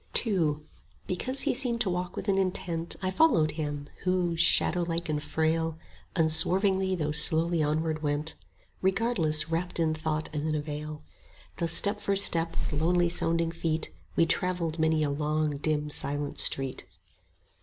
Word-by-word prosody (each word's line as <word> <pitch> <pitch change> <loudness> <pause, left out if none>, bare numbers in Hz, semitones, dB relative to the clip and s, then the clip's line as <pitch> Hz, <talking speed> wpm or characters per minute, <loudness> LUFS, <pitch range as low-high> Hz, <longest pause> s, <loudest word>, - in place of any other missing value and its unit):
II 170 -9 +1 0.5
Because 255 +9 0
he - - +1
seemed 245 -2 +3
to 195 - +1
walk 180 0 -4
with - - -6
an 195 -1 +2
intent 175 -3 -2
I 185 - 0
followed 185 - +3
him; 145 -2 -5
who, 180 -2 0
shadowlike 170 0 +3
and 150 -1 -1
frail, 160 +1 -1 0.4
Unswervingly 190 +4 +3
though 150 -4 -2
slowly 165 +2 +2
onward 155 +1 -1
went, 150 +1 -1 0.5
Regardless, 185 -6 +1
wrapt 175 +1 -2
in 160 -1 +1
thought 155 0 -3
as 150 - -2
in 155 0 -1
a 150 - -1
veil: 150 0 -7 0.5
Thus 165 -2 +1
step 205 +4 +1
for 200 -1 0
step 170 -4 +3
with 150 0 -2
lonely 175 +1 +2
sounding 165 -1 0
feet 160 -1 -2
5 - - -26 0.2
We 165 - +5
travelled 175 -2 -1
many 160 -1 +2
a 145 - 0
long 150 0 -1
dim 150 0 -1
silent 145 0 -2
street. 135 -1 +3
165 Hz, 155 wpm, -28 LUFS, 155-180 Hz, 0.5 s, We